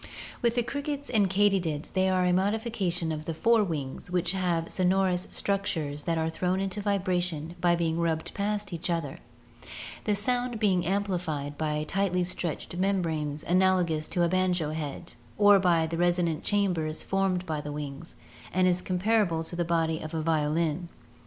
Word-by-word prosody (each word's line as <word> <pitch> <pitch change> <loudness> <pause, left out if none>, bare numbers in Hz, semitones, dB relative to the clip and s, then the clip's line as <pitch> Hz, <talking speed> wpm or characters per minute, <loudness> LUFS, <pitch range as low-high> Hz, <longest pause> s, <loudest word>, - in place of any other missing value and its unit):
With 235 -1 +2
the 240 - +2
crickets 285 +2 -4
and 205 -5 +3
katydids 190 -6 +1
they 190 0 +2
are 185 -1 +2
a 180 - +3
modification 195 -4 0
of 155 0 -4
the 165 - -3
fore 230 +5 +4
wings, 150 -5 -4
which 180 -1 +1
have 175 -3 0
sonorous 185 0 +1
structures 160 -8 -2
that 165 -1 0
are 160 0 0
thrown 180 +3 -1
into 195 +1 -2
vibration 180 -5 -1
by 175 -1 +4
being 165 -1 0
rubbed 165 -1 -1
past 205 -1 -2
each 170 +2 -3
other, 165 -5 -2 0.9
the 210 - +2
sound 245 +2 -1
being 190 -5 +2
amplified 175 -7 -1
by 150 0 -1
tightly 190 -1 +1
stretched 175 -2 -3
membranes 160 -6 -1
analogous 180 -4 +2
to 175 - 0
a - - +4
banjo 180 -3 +1
head, 155 -3 -5 0.2
or 205 -1 +7
by 170 -3 +3
resonant 170 0 0
chambers 175 -7 0
formed 190 -2 0
by 155 -3 -2
the 150 - -6
wings, 145 +2 -6 0.4
and 180 0 +2
comparable 185 -3 +1
to 170 - -6
the 175 - 0
body 165 -1 0
of 155 +1 -6
a 160 - -1
violin. 160 +1 0
180 Hz, 160 wpm, -28 LUFS, 160-195 Hz, 0.9 s, or